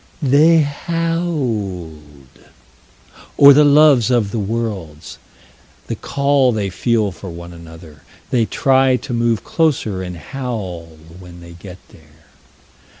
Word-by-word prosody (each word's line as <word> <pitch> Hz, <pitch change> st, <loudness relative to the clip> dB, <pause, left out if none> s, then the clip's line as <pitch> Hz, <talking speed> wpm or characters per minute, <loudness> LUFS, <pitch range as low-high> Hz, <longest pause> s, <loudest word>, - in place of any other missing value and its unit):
They 155 Hz, +4 st, +4 dB
howled. 145 Hz, -, -3 dB, 1.4 s
Or 140 Hz, 0 st, +8 dB
the 150 Hz, +2 st, +5 dB
loves 145 Hz, -5 st, +4 dB
of 115 Hz, -5 st, 0 dB
the 115 Hz, -, -3 dB
worlds. 100 Hz, -8 st, -5 dB, 0.7 s
The -, -, -5 dB
call 140 Hz, -2 st, +1 dB
they 105 Hz, -4 st, -3 dB
feel 110 Hz, +2 st, 0 dB
for 95 Hz, +1 st, -10 dB
one 85 Hz, 0 st, -10 dB
another. 80 Hz, -2 st, -14 dB, 0.3 s
They 115 Hz, -3 st, +1 dB
try 130 Hz, -1 st, +2 dB
to 125 Hz, 0 st, -6 dB
move 115 Hz, -2 st, 0 dB
closer 130 Hz, -, -1 dB
and 90 Hz, -1 st, -7 dB
howl 90 Hz, -, -7 dB, 0.2 s
when 90 Hz, -1 st, -13 dB
they 85 Hz, 0 st, -13 dB
get 90 Hz, +1 st, -12 dB
there. 80 Hz, 0 st, -22 dB
110 Hz, 120 wpm, -17 LUFS, 85-140 Hz, 1.4 s, Or